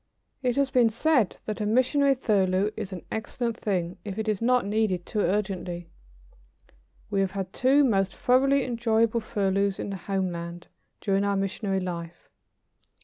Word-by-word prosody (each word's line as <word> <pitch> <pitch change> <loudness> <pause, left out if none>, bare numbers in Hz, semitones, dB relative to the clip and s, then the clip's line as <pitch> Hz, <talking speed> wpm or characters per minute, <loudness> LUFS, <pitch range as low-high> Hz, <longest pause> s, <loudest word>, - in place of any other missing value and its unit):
It 250 -2 0
has 275 -1 +1
been 245 -3 +4
said 240 - +2
that 215 0 -4
a - - 0
missionary 270 +5 +3
furlough 200 -4 +1
is 195 - -5
an 180 -2 -7
excellent 230 +1 -2
thing 180 -6 -2
if 200 -1 -6
it 220 0 -2
is 215 -1 0
not 250 0 +3
needed 205 -4 0
too 215 - -3
urgently. 185 -4 -2 1.2
We 200 - +1
have 190 -1 -1
had 190 -2 -4
two 270 +3 +4
most 195 -7 +1
thoroughly 270 +2 +3
enjoyable 230 -1 +1
furloughs 200 -2 0
in - - -4
the 195 - -4
homeland, 175 -3 -4 0.3
during 195 -1 +1
our 200 0 +1
missionary 195 0 -1
life. 170 -2 -6
205 Hz, 155 wpm, -26 LUFS, 190-235 Hz, 1.2 s, been